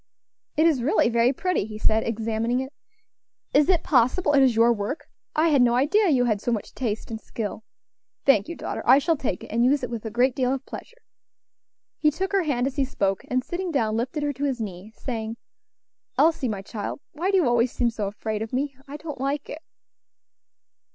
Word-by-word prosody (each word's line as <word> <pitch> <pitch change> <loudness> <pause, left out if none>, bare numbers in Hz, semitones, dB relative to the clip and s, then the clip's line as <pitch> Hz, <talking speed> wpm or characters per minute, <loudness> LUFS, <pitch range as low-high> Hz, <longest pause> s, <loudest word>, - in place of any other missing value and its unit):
"It 315 - +4
is 305 -7 +3
really 245 -2 +3
very 235 +1 +3
pretty," 365 - -1
he 215 0 -8
said, 220 +1 +2
examining 230 +2 -1
it; 265 +2 -5 0.8
"is 295 +3 +4
it 355 -3 +3
possible 290 +4 +3
it 280 - +6
is 255 -3 +4
your 230 +1 +5
work? 210 +7 -4 0.3
I 320 +2 +3
had 285 -4 +4
no 240 -1 +4
idea 345 - +3
you 255 -5 +3
had 215 -4 0
so 240 - -1
much 220 -3 -3
taste 225 -3 -3
and 220 -1 -5
skill. 220 -1 -5 0.6
Thank 220 -7 +4
you, 340 - -5
daughter; - - -4
I 260 +3 +7
shall 320 +4 +2
take 255 - -3
it, - - -10
and 235 +2 +2
use 270 +2 +3
it 245 - -3
with 230 -2 -4
a 220 - -4
great 245 +3 +2
deal 255 -2 +1
of 265 - -8
pleasure." 485 - -9 1.0
He 305 - +4
took 375 +6 -3
her 395 -1 +3
hand 270 -7 0
as 270 +1 -3
he 275 - +3
spoke, 195 -8 -1
and 255 0 0
sitting 360 +4 -4
down, 220 -7 +1
lifted 255 +6 -2
her 290 0 0
to 275 +2 -6
his 265 -3 -1
knee, 200 -1 -6
saying, 225 -3 -4 0.8
"Elsie, 320 -6 +3
my 200 -3 -4
child, 205 +4 -5
why 340 +6 -2
do 390 - +3
you 340 -8 +3
always 240 0 +2
seem 240 -2 0
so 215 -3 -3
afraid 215 +1 -4
of 220 - -4
me? 275 +2 -1
I 285 +2 -7
don't 300 -4 -7
like 280 +2 -2
it." 310 - -7
250 Hz, 215 wpm, -25 LUFS, 225-290 Hz, 1.0 s, I